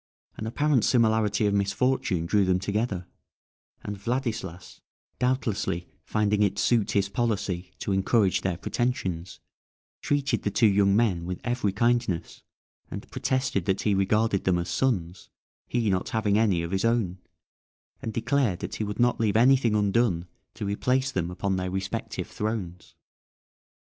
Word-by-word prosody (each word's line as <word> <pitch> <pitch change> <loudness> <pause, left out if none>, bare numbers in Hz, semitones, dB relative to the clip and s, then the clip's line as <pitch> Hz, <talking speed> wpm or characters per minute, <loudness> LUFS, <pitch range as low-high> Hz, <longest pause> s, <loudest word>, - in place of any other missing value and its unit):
An 110 - -5
apparent 140 0 +2
similarity 110 -3 +2
of 100 - +2
misfortune 100 -3 +1
drew 100 +4 +3
them 95 -1 +2
together, 100 -1 -2 0.8
and 105 - -4
Vladislas, 110 -6 -4 0.4
doubtlessly 120 -9 -1
finding 105 -1 +1
it 100 -2 +2
suit 115 -4 +2
his 100 -1 +2
policy 100 -5 -2
to - - -3
encourage 95 +1 +2
their 90 -3 -1
pretensions, 95 -6 -2 0.6
treated 140 -5 0
the - - -1
two 115 - +2
young 100 -1 +4
men 95 -7 +1
with 90 0 -4
every 120 -4 0
kindness, 115 -4 0 0.7
protested 130 -8 -1
that 95 0 0
he 105 - +2
regarded 100 +1 +1
them 90 -2 +2
as 85 0 -3
sons, 95 -9 -1 0.4
he 120 -2 0
not 95 -1 -1
having 110 -3 +1
any 100 -6 +2
of 85 - -5
his 95 0 0
own, 115 -6 +1 0.8
and 110 - -3
declared 115 -3 +1
that - - -5
he - - -2
would 105 +2 -5
not 120 0 +3
leave 110 -2 +2
anything 125 -2 +4
undone 100 -4 +1 0.3
to 110 -2 -4
replace 125 +6 0
them 90 -7 -1
upon 95 +1 -1
their 90 0 -2
respective 95 +1 -3
thrones. 100 -5 -5
105 Hz, 145 wpm, -26 LUFS, 95-120 Hz, 0.8 s, young